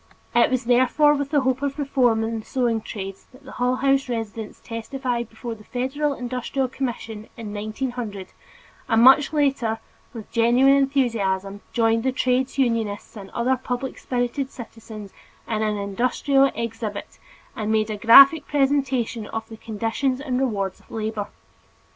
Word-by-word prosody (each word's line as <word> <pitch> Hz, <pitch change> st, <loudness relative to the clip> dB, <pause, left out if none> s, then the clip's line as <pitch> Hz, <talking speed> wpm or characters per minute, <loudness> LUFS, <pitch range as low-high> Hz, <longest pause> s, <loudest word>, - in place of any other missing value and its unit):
It 235 Hz, -, +4 dB
was 255 Hz, -1 st, 0 dB
therefore 255 Hz, +5 st, +4 dB
with 285 Hz, -1 st, -2 dB
the 290 Hz, -2 st, +2 dB
hope 260 Hz, 0 st, 0 dB
of 280 Hz, 0 st, -2 dB
reform 255 Hz, -6 st, +2 dB
in 225 Hz, 0 st, -2 dB
the -, -, -9 dB
sewing 240 Hz, -4 st, 0 dB
trades 195 Hz, -3 st, -7 dB
that 260 Hz, +2 st, -18 dB
the 265 Hz, -, -11 dB
Hull 250 Hz, +1 st, 0 dB
House 270 Hz, 0 st, +1 dB
residents 225 Hz, -2 st, -5 dB
testified 240 Hz, 0 st, -4 dB
before 230 Hz, +1 st, -6 dB
the 215 Hz, -1 st, -13 dB
Federal 270 Hz, +5 st, -2 dB
Industrial 255 Hz, +2 st, -2 dB
Commission 230 Hz, -4 st, -5 dB
in 215 Hz, -3 st, -7 dB
1900, 215 Hz, -1 st, -4 dB, 0.6 s
and 225 Hz, +1 st, +4 dB
much 270 Hz, +3 st, +7 dB
later 275 Hz, -7 st, +1 dB, 0.3 s
with 225 Hz, -4 st, -10 dB
genuine 245 Hz, +4 st, +4 dB
enthusiasm 225 Hz, -8 st, 0 dB
joined 225 Hz, -1 st, +2 dB
with 260 Hz, 0 st, 0 dB
trades 255 Hz, +2 st, 0 dB
unionists 230 Hz, -6 st, -1 dB
and 195 Hz, -2 st, -9 dB
other 250 Hz, +2 st, +1 dB
public 255 Hz, +1 st, -4 dB
spirited 250 Hz, +2 st, -2 dB
citizens 220 Hz, -4 st, -10 dB, 0.3 s
in 220 Hz, -1 st, -1 dB
an 215 Hz, -1 st, 0 dB
industrial 250 Hz, +7 st, +2 dB
exhibit 225 Hz, -3 st, -5 dB, 0.3 s
which 215 Hz, -, -4 dB
made 215 Hz, 0 st, +1 dB
a -, -, -2 dB
graphic 275 Hz, +8 st, +8 dB
presentation 270 Hz, -6 st, 0 dB
of 225 Hz, 0 st, -5 dB
the 225 Hz, -, -9 dB
conditions 230 Hz, +5 st, -2 dB
and 260 Hz, -3 st, -2 dB
rewards 200 Hz, -7 st, -1 dB
of -, -, -25 dB
labor. 215 Hz, -2 st, -3 dB
240 Hz, 155 wpm, -23 LUFS, 220-265 Hz, 0.6 s, graphic